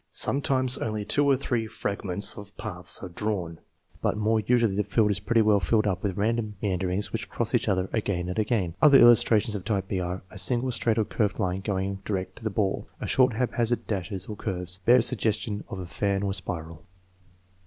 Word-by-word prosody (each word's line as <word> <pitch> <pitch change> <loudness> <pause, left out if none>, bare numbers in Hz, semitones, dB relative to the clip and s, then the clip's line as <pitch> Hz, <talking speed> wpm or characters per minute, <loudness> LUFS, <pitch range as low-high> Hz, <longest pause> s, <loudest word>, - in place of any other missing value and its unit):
Sometimes 130 -2 +2
only 110 -2 -3
two 145 +5 +2
or 135 -2 +4
three 120 -4 -1
fragments 100 -3 -3
of 100 -1 -11
paths 90 -3 -2
are 95 - -5
drawn, 90 -3 -3 0.4
but - - 0
more 110 +1 +2
usually 115 -2 +2
the 105 - +1
field 105 +1 +2
is 100 - 0
pretty 115 +2 +2
well 105 -1 +4
filled 105 +5 +1
up 95 -2 -1
with 100 -2 -2
random 110 0 0
meanderings 95 0 -2
which - - -4
cross - - -3
each - - +1
other 95 -1 +1
again 100 -5 -1
and 90 +4 -2
again. 105 -6 0
Other 140 -2 +8
illustrations 115 -2 +5
of 100 -3 -4
type 95 -1 -1
b 95 - -2
are: 90 +1 -4
A - - -9
single 120 +7 0
straight 115 -2 0
or 110 - +2
curved 105 -2 -1
line 95 +1 -1
going 95 -1 -2
direct 95 -3 -3
to - - -12
the 110 - 0
ball, 100 -1 -1 0.2
short 130 -2 +3
haphazard 120 0 0
dashes 95 -2 -3
or 105 - -6
curves, 90 -3 -4
bare 125 0 +7
suggestion 110 -3 -1
of 100 - -5
a 95 - -5
fan 100 +2 -1
or 100 -1 -1
spiral. 85 -4 -6
105 Hz, 200 wpm, -26 LUFS, 95-115 Hz, 0.4 s, Other